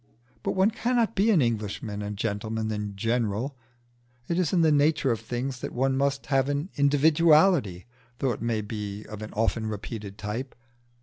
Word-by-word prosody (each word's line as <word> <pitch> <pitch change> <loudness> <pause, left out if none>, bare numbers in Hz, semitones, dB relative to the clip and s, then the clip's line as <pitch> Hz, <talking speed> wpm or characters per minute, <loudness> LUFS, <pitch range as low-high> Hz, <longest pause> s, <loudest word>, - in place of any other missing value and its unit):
But - - -1
one 190 +3 +3
cannot 235 -1 +1
be 205 +4 +2
an 180 -10 +5
Englishman 105 -2 -2
and 105 0 -5
gentleman 110 +1 -2
in 105 -1 -4
general: 115 +4 -1 0.7
it 170 +1 0
is 175 -5 +1
in 180 - +3
the 160 -1 +4
nature 150 -2 +3
of 115 - -1
things 125 +1 -4
that - - -5
one 135 +2 +1
must 140 0 0
have 135 -1 +1
an 145 +5 -2
individuality, 150 - +4 0.3
though 135 - 0
it 110 - -5
may 115 -2 0
be 105 0 -6
of 105 0 -8
an 110 - -7
often 110 0 0
repeated 105 -1 -6
type. 115 +6 -5
120 Hz, 175 wpm, -27 LUFS, 105-150 Hz, 0.7 s, an